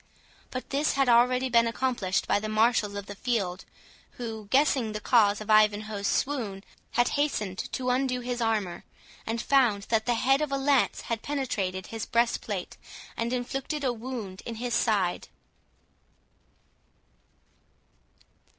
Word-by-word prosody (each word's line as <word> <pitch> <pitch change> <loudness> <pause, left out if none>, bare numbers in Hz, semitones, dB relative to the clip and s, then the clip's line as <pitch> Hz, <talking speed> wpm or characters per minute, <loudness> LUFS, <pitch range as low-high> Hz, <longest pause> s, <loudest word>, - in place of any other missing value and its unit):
But 255 - -6
this 285 +2 +1
had 275 0 +2
been 245 - +5
already 250 +2 +4
accomplished 230 -4 +1
by - - +2
the 215 +1 -4
marshals 215 -1 +2
of 200 -1 -5
the 205 - -7
field, 200 -5 -2 0.5
who, 220 -3 -6
guessing 260 -3 +2
the 215 - -3
cause 210 -3 +3
of 215 0 -3
Ivanhoe's 210 -1 +3
swoon, 225 -9 -1 0.3
had 240 +1 +3
hastened 210 -10 -1
to 255 -1 0
undo 250 -1 0
his 245 0 -3
armour, 215 -6 -1 0.4
and 225 +1 -1
found 235 -6 +3
that 225 0 +1
the 240 - +2
head 270 +5 +3
of 300 -2 -1
a 275 - +1
lance 275 -1 +2
had 230 -2 -3
penetrated 200 -10 -2
his 225 -2 -4
breastplate, 235 0 -1 0.4
and 230 +1 -2
inflicted 270 +4 -3
a 255 -2 +1
wound 225 -5 -6
in 230 - -6
his 240 +1 -3
side. 200 -6 +1
230 Hz, 140 wpm, -27 LUFS, 210-255 Hz, 0.5 s, been